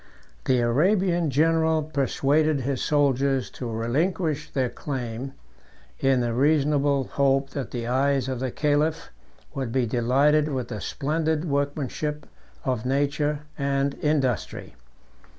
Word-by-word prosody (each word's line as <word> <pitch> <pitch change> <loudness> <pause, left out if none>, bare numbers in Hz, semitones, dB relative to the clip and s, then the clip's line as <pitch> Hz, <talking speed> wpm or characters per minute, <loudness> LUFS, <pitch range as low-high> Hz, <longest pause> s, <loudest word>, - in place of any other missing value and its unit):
251 - - -7 0.5
The 190 - 0
Arabian 170 -3 +1
general 160 +2 +2
persuaded 145 0 +1
his 130 0 -2
soldiers 140 -3 +1
to 125 - -6
relinquish 150 +7 -1
their 130 -2 0
claim, 130 -1 -5 0.7
in 135 -2 +3
the 120 -1 -1
reasonable 145 0 +2
hope 135 +1 +1
that 140 -3 -4
the 120 -2 -4
eyes 135 +1 +1
of 130 -2 -3
the 130 0 -2
caliph 150 +4 0 0.4
would 135 -5 -3
be 130 0 +1
delighted 135 +6 +2
with 130 -5 -3
the 105 - -5
splendid 155 +2 -1
workmanship 145 0 -2 0.4
of 125 -4 -1
nature 145 +2 0 0.2
and 140 0 0
industry. 140 -6 -1
140 Hz, 125 wpm, -25 LUFS, 130-150 Hz, 0.7 s, in